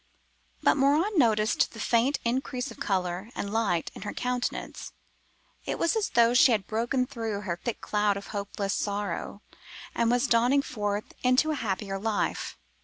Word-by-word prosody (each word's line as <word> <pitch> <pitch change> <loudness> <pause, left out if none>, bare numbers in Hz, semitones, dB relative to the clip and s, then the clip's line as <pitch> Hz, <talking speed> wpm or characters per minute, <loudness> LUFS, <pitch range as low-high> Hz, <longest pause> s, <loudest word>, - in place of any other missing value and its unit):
But - - +4
Morin 300 +10 +3
noticed 215 -4 +3
the 225 - -10
faint 240 +6 +2
increase 250 +1 -1
of - - -12
colour 190 -4 -1
and 200 +1 -4
light 200 -7 0
in - - -10
her 205 - -5
countenance. 250 0 -3 0.7
It - - -1
was 335 - +1
as 440 -2 0
though 235 0 +4
she 250 +1 +6
had 210 -4 +1
broken 240 +4 0
through 225 -4 -4
her 175 -4 -3
thick 235 - -3
cloud 210 -1 +1
of 200 - -8
hopeless 200 -1 -2
sorrow, 205 0 -3 0.5
and 235 -1 +1
was 245 +2 +2
dawning 250 +3 +3
forth 205 -3 -3
into 255 +5 +3
a - - 0
happier 195 -5 -3
life. 215 0 -2
225 Hz, 165 wpm, -28 LUFS, 205-250 Hz, 0.7 s, she